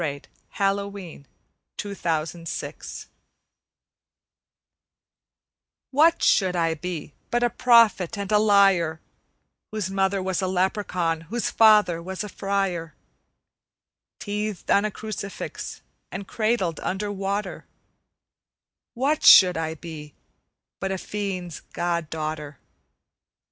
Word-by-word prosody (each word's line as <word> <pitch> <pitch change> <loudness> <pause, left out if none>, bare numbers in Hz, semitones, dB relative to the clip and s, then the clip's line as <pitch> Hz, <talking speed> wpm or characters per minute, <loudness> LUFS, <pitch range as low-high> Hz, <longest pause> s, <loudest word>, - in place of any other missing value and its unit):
The 145 -3 -3 0.3
Singing 195 -1 +3
Woman 200 -7 -8 0.5
from 205 -1 -4
the 160 -4 -1
Wood's 165 -1 -5
Edge - - -9 2.8
WHAT 320 +5 +4
should 185 -3 +3
I 165 -1 +1
be 160 -2 -6 0.2
but 240 0 +1
a 240 - +2
prophet 230 -5 +4
and 200 0 -4
a 210 - +5
liar, 195 -6 +4 0.7
Whose 210 -4 -3
mother 195 0 0
was 190 -1 -1
a 190 - 0
leprechaun, 180 -3 0
whose 235 +2 -1
father 210 -6 +5
was 190 +3 -5
a 210 - -6
friar? 195 -4 -2 1.2
Teethed 210 -1 -3
on 200 +1 +4
a - - 0
crucifix 210 -1 -6 0.3
and 195 +1 -6
cradled 215 -8 0
under 205 +2 -3
water, 195 -1 -3 1.3
What 280 +5 +1
should 180 -2 +9
I 160 0 -2
be 150 -2 -10 0.6
but 195 +1 -2
a 190 - -1
fiend's 185 -4 -4
god 170 -2 -1
daughter? 155 -2 -5
190 Hz, 110 wpm, -24 LUFS, 170-205 Hz, 2.8 s, should